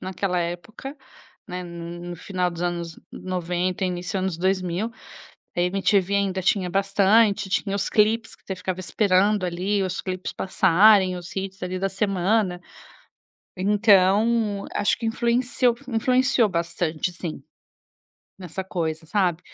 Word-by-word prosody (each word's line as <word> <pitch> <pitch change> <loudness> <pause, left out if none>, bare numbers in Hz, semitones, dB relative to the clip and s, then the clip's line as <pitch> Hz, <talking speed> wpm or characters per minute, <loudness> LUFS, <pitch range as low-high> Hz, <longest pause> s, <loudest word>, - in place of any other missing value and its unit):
naquela 185 0 -2
época, 175 - -6 0.5
né, 180 -2 -5
n 170 0 -7
no 175 - -6
final 180 0 -2
dos 170 0 -6
anos 170 -2 -3
90, 180 +1 -2
início 180 +1 -2
anos 185 -3 -2
2000. 185 +3 0 0.7
A - - +1
MTV 195 +1 +2
ainda 195 -2 0
tinha 185 0 +1
bastante, 200 +2 +3
tinha 200 0 0
os 200 - -2
clipes 220 +1 +2
que - - -25
você 190 - -4
ficava 185 0 -4
esperando 195 +3 +2
ali 185 +3 -1
os 185 -2 -2
clipes 185 -1 -4
passarem, 190 0 +4
os 175 0 -9
hits, 190 -1 -5
ali, 185 0 -3
da 195 +1 0
semana. 195 -1 0 1.0
Então 205 +2 +3
acho 205 - +1
que 230 - -5
influenceu 240 +1 +1
influenciou 250 -1 +2
bastante, 170 -1 -2
sim, 170 -2 -6 1.0
nessa 185 0 -6
coisa, 160 -3 -3
sabe. 180 -3 +1
190 Hz, 130 wpm, -24 LUFS, 180-205 Hz, 1.0 s, passarem